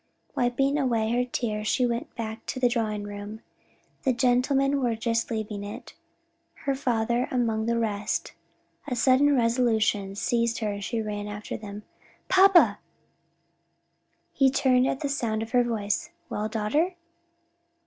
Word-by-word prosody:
Wiping 270 Hz, +4 st, +1 dB
away 230 Hz, -5 st, +1 dB
her 245 Hz, +1 st, +2 dB
tears 215 Hz, -4 st, -3 dB
she 250 Hz, +3 st, +2 dB
went 235 Hz, 0 st, -3 dB
back 220 Hz, -1 st, -5 dB
into 255 Hz, -, -5 dB
the 250 Hz, -, +4 dB
drawing 220 Hz, -4 st, -1 dB
room. 205 Hz, +2 st, -7 dB, 0.6 s
The 265 Hz, -, +2 dB
gentlemen 270 Hz, +3 st, +2 dB
were 240 Hz, -3 st, +1 dB
just 230 Hz, +1 st, -1 dB
leaving 215 Hz, -3 st, -4 dB
it, 205 Hz, +1 st, -8 dB, 0.7 s
her 275 Hz, -, +2 dB
father 240 Hz, -2 st, 0 dB
among 225 Hz, -3 st, 0 dB
the 235 Hz, 0 st, +1 dB
rest. 210 Hz, -2 st, -2 dB, 0.5 s
A 255 Hz, -, -2 dB
sudden 270 Hz, +4 st, +4 dB
resolution 225 Hz, -5 st, +1 dB
seized 230 Hz, +2 st, 0 dB
her 215 Hz, -2 st, -1 dB
and 200 Hz, 0 st, -5 dB
she 225 Hz, +2 st, -2 dB
ran 205 Hz, -1 st, -4 dB
after 205 Hz, 0 st, -6 dB
them. 210 Hz, 0 st, -8 dB, 0.5 s
"Papa!" 370 Hz, -, +6 dB, 1.5 s
He 270 Hz, -1 st, +4 dB
turned 260 Hz, -1 st, +3 dB
at 270 Hz, -, -2 dB
the 290 Hz, -, 0 dB
sound 225 Hz, -6 st, -1 dB
of 225 Hz, -, -9 dB
her 245 Hz, -1 st, +4 dB
voice. 210 Hz, -4 st, -2 dB, 0.2 s
"Well 210 Hz, +1 st, -2 dB
daughter?" 285 Hz, -, 0 dB
230 Hz, 145 wpm, -26 LUFS, 215-255 Hz, 1.5 s, Papa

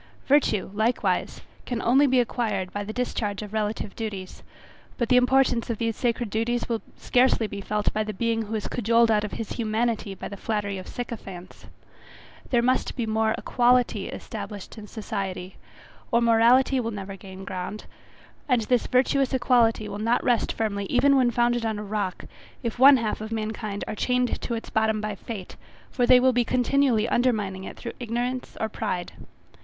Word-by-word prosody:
Virtue 260 Hz, -10 st, +2 dB
likewise 220 Hz, +4 st, 0 dB, 0.3 s
can 245 Hz, -2 st, -2 dB
only 270 Hz, +5 st, +4 dB
be 260 Hz, -1 st, +3 dB
acquired 215 Hz, -6 st, -1 dB
by 205 Hz, -, -3 dB
the 205 Hz, -, -5 dB
discharge 215 Hz, -4 st, -2 dB
of 210 Hz, 0 st, -9 dB
relative 210 Hz, -1 st, -2 dB
duties; 200 Hz, -5 st, -6 dB, 0.6 s
but 235 Hz, -3 st, -1 dB
the 250 Hz, -, +5 dB
importance 250 Hz, -1 st, +3 dB
of 230 Hz, -, -1 dB
these 230 Hz, 0 st, -1 dB
sacred 240 Hz, -3 st, -1 dB
duties 235 Hz, +2 st, -1 dB
will 230 Hz, -2 st, -2 dB, 0.2 s
scarcely 250 Hz, -2 st, +3 dB
be 200 Hz, -1 st, -6 dB
felt 210 Hz, +1 st, -1 dB
by 215 Hz, -, 0 dB
the 215 Hz, -, -4 dB
being 225 Hz, +2 st, 0 dB
who 220 Hz, 0 st, -4 dB
is 215 Hz, -, -3 dB
cajoled 230 Hz, 0 st, +3 dB
out 210 Hz, -1 st, +2 dB
of 210 Hz, -, -5 dB
his 225 Hz, -, -5 dB
humanity 220 Hz, -2 st, -1 dB
by -, -, -6 dB
the 200 Hz, -, -7 dB
flattery 205 Hz, -1 st, -2 dB
of 185 Hz, -, -10 dB
sycophants. 195 Hz, -7 st, -8 dB, 0.8 s
There 240 Hz, -2 st, +2 dB
must 255 Hz, +1 st, +1 dB
be 240 Hz, -, -1 dB
more 220 Hz, 0 st, +1 dB
equality 245 Hz, 0 st, +2 dB
established 205 Hz, -3 st, -7 dB
in 215 Hz, -2 st, -10 dB
society, 195 Hz, -4 st, -5 dB, 0.5 s
or 235 Hz, -, +4 dB
morality 235 Hz, +3 st, +4 dB
will 230 Hz, -2 st, -2 dB
never 200 Hz, -2 st, -6 dB
gain 190 Hz, 0 st, -10 dB
ground, 185 Hz, +3 st, -5 dB, 0.6 s
and 250 Hz, -3 st, +3 dB
this 245 Hz, +2 st, +1 dB
virtuous 265 Hz, +1 st, +2 dB
equality 235 Hz, -4 st, +3 dB
will 205 Hz, -, -6 dB
not 230 Hz, +3 st, +1 dB
rest 245 Hz, -3 st, +2 dB
firmly 200 Hz, -3 st, -2 dB
even 275 Hz, +3 st, +4 dB
when 255 Hz, -2 st, +4 dB
founded 240 Hz, 0 st, +1 dB
on 220 Hz, -2 st, -1 dB
a 210 Hz, -, -5 dB
rock, 205 Hz, -2 st, -3 dB, 0.4 s
if 235 Hz, 0 st, -3 dB
one 270 Hz, +1 st, +9 dB
half 220 Hz, -3 st, -2 dB
of 220 Hz, +1 st, -6 dB
mankind 215 Hz, -2 st, -3 dB
are -, -, -3 dB
chained 250 Hz, +3 st, 0 dB
to 235 Hz, -, -2 dB
its 225 Hz, -, -7 dB
bottom 220 Hz, 0 st, +1 dB
by 210 Hz, 0 st, -3 dB
fate, 200 Hz, -1 st, -8 dB, 0.3 s
for 245 Hz, -3 st, +1 dB
they 250 Hz, 0 st, +8 dB
will 260 Hz, 0 st, +4 dB
be 245 Hz, 0 st, +3 dB
continually 250 Hz, -2 st, +2 dB
undermining 210 Hz, -7 st, 0 dB
it -, -, -8 dB
through 235 Hz, -, -6 dB
ignorance 245 Hz, +2 st, -3 dB
or 220 Hz, -, 0 dB
pride. 195 Hz, -5 st, -3 dB
225 Hz, 180 wpm, -25 LUFS, 210-245 Hz, 0.8 s, one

